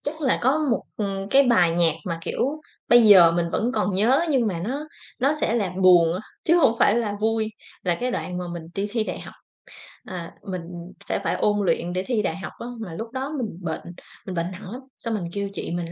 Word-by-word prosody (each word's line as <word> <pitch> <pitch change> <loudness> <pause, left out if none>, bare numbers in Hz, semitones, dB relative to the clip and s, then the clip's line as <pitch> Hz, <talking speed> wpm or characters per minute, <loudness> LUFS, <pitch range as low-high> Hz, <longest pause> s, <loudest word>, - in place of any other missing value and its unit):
chắc 310 +2 -4
là 265 -3 +2
có 265 +5 +3
một, - - +1
ừm, 195 -1 -3
cái 275 +1 +6
bài 205 -10 +4
nhạc 165 -2 +2
mà, 170 -4 -3
kiểu, 290 - -2 0.3
bây 240 0 +7
giờ 180 -5 +8
mình 170 0 0
vẫn 235 +7 0
còn 185 -5 0
nhớ, 240 - +4
nhưng 250 -5 +2
mà 185 -5 -1
nó 285 +6 -4 0.3
nó 275 +3 +3
sẽ 225 - +1
là 200 -6 0
buồn 175 -3 +6
á, 185 - -3 0.2
chứ 335 +2 +4
hông 230 -8 +4
phải 210 - +4
là 210 -3 -1
vui. 220 0 +1 0.3
Là 175 -2 +1
cái 250 +7 -2
đoạn 180 -6 -3
mà 180 - -3
mình 170 -2 -6
đi 200 +1 -1
thi 225 0 0
đại - - -5
học. - - -10 0.7
À, 175 -3 -7
mình 185 -2 -4 0.5
sẽ - - 0
phải - - 0
ôn 205 -1 +1
luyện 175 0 0
để 185 +1 -1
thi 235 -4 0
đại 165 -4 -2
học 195 - -6
á, 235 - -6
mà 200 -7 -6
lúc 225 +7 -6
đó 265 +3 -4
mình 215 -8 -4
bệnh, 165 -3 -3 0.4
mình 185 -2 -5
bệnh 170 +2 -2
nặng 185 +1 -9
lắm. 250 +3 -7 0.2
Xong 230 -1 -4
mình 200 -5 -2
kêu 200 -1 -2
chị - - -5
mình 170 -1 -3
205 Hz, 240 wpm, -24 LUFS, 175-240 Hz, 0.7 s, giờ